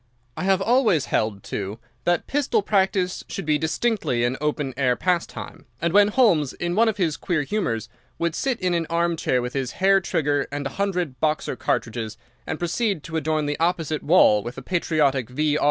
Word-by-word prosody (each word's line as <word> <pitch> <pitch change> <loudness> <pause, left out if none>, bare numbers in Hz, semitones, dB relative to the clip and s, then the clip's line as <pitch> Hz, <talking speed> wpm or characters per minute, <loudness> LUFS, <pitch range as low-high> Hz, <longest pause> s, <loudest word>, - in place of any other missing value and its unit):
I - - -3
have 190 0 +3
always 225 - +3
held, 105 -2 -1
too, 100 +1 -4 0.3
that 175 -1 +1
pistol 290 - 0
practice 190 -2 +1
should 195 - -5
be 150 -1 +2
distinctly 160 - 0
an 120 +2 +1
open 150 -3 -1
air 130 -2 +2
pastime; 175 -4 -3
and 170 +2 -1
when 205 0 +6
Holmes, 205 - +3
in 175 0 -3
one 225 +4 +4
of 215 - -3
his 165 -6 0
queer 170 -6 -1
humours, 135 - -2 0.3
would 170 -1 -1
sit 260 +6 -1
in 180 -1 0
an 165 -2 0
armchair 170 -7 +1
with 125 - -4
his 135 -3 -2
hair 195 +1 +4
trigger 150 -5 0
and 145 0 -4
a - - -1
hundred 180 -9 -1
Boxer 155 -3 0
cartridges, 115 -3 -2 0.3
and - - -2
proceed 175 0 -1
to 165 - -7
adorn 155 -1 0
the 145 0 -2
opposite 165 -2 0
wall 145 - +5
with 120 +4 -7
a - - -7
patriotic 145 -8 +1
V. 150 +3 0
160 Hz, 185 wpm, -23 LUFS, 140-190 Hz, 0.3 s, when